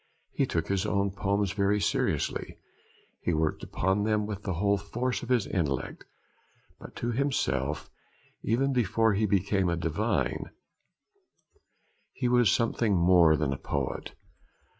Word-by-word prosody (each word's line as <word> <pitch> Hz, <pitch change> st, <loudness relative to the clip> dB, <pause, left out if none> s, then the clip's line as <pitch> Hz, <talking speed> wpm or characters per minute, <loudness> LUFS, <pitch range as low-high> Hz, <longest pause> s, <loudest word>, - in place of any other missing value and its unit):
He -, -, +1 dB
took 80 Hz, -1 st, -1 dB
his 95 Hz, -1 st, 0 dB
own 100 Hz, -1 st, +1 dB
poems 100 Hz, 0 st, 0 dB
very 100 Hz, 0 st, +1 dB
seriously, -, -, -1 dB, 0.6 s
he 90 Hz, -, 0 dB
worked 80 Hz, 0 st, 0 dB
upon 95 Hz, +3 st, 0 dB
them 105 Hz, -1 st, +1 dB
with 105 Hz, -2 st, -5 dB
the 95 Hz, -3 st, -3 dB
whole 100 Hz, +3 st, +1 dB
force 120 Hz, +5 st, -2 dB
of 120 Hz, -, -8 dB
his 125 Hz, -5 st, +2 dB
intellect; 70 Hz, -8 st, -2 dB, 0.7 s
but -, -, -12 dB
to 120 Hz, -, -2 dB
himself, 75 Hz, -, -1 dB, 0.5 s
even 135 Hz, +4 st, +1 dB
before 115 Hz, -2 st, +2 dB
he 105 Hz, +2 st, +1 dB
became 95 Hz, -1 st, +1 dB
a 85 Hz, -, 0 dB
divine, 85 Hz, +7 st, -1 dB, 1.6 s
he 125 Hz, -, -1 dB
was 120 Hz, -4 st, +4 dB
something 115 Hz, -2 st, +1 dB
more 85 Hz, -2 st, +5 dB
than 70 Hz, -3 st, 0 dB
a -, -, -4 dB
poet. 70 Hz, -3 st, -3 dB
100 Hz, 140 wpm, -28 LUFS, 85-110 Hz, 1.6 s, more